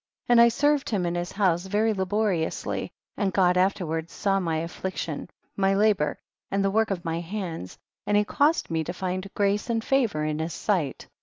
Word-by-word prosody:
4. 245 - +3
And 235 - +8
I 235 - +8
served 290 +4 +2
him 195 -5 0
in 170 - -1
his 175 0 -3
house 185 -3 +1
very 215 +3 +2
laboriously, 190 -3 -1 0.3
and 200 -3 +1
God 180 0 +3
afterward 175 -3 0
saw 195 -1 0
my 165 -4 -1
affliction, 165 -1 -4 0.3
my 195 0 +2
labor 205 -7 +2 0.3
and 195 0 0
the 195 - +2
work 220 +2 +2
of 180 -4 -3
my 165 0 -1
hands, 170 - -5 0.3
and 205 - +3
he 210 - +4
caused 295 - +1
me 160 -1 0
to - - -4
find 185 +1 -4
grace 205 +3 +1
and 225 -1 0
favor 230 - +1
in 155 0 -1
his 160 0 -3
sight. 175 -10 -1
190 Hz, 190 wpm, -26 LUFS, 170-210 Hz, 0.3 s, And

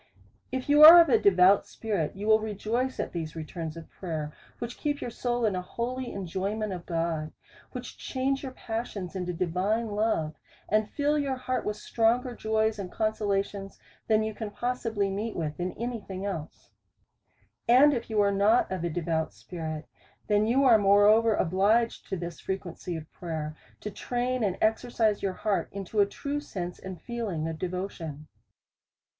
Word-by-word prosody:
If 260 -1 -3
you 295 +1 +5
are 330 +3 +13
of 335 -3 +6
a 230 -4 +5
devout 190 0 +5
spirit, 200 -9 -2
you 200 +2 -5
will 220 0 +5
rejoice 220 +4 -2
at - - -2
these 160 -3 -5
returns 160 0 -6
of 165 - -9
prayer, 155 -5 -5 0.2
which 235 0 -6
keep 290 -1 -1
your 240 - -5
soul 240 0 -1
in 205 -3 +1
an 180 - -1
holy 245 +6 -4
enjoyment 195 +3 -3
of 175 -2 -8
God; 165 -2 -1 0.4
wliich - - -7
change 270 +1 -1
your 265 - -5
passions 225 -6 -5
into 180 -1 -2
divine 185 +6 0
love^. 205 -7 0 0.3
and 215 0 +1
fill 295 +1 +1
your 275 -2 -1
heart 255 0 -2
with 210 - -1
stronger 235 +3 +1
joys 220 -1 0
and 185 -3 -5
consolations, 200 -2 -1 0.3
than 215 -1 +3
you 220 0 -3
can 215 0 -5
possibly 230 -3 -1
meet 210 +3 -3
with 155 -2 -3
in 180 0 -2
any 235 0 -4
thing 190 0 -6
else. 165 -6 -6 1.0
And 265 +5 +7
if 235 -3 -3
you 215 -2 +2
are 200 0 +3
not 205 +4 +3
of 185 -3 -3
a 170 - 0
devout 160 -1 -1
spirit, 160 -3 -6 0.4
then 210 0 +2
you 260 +4 +3
are 235 -5 +7
moreover 205 +2 +5
obliged 205 +7 +2
to 190 - -2
this 170 0 -6
frequency 180 -2 -5
of 160 -1 -8
prayer, 155 -3 -5 0.3
to 210 - -5
train 245 +3 -2
and 195 -3 0
exercise 220 -1 +1
your 195 -1 -1
heart 205 +1 -1
into 200 +2 -4
a 200 - +5
true 285 +7 -3
sense 180 -11 -6
and 190 -2 -8
feeling 215 -10 -3
of 160 -1 -5
devotion. 175 -5 -5
205 Hz, 175 wpm, -28 LUFS, 180-230 Hz, 1.0 s, are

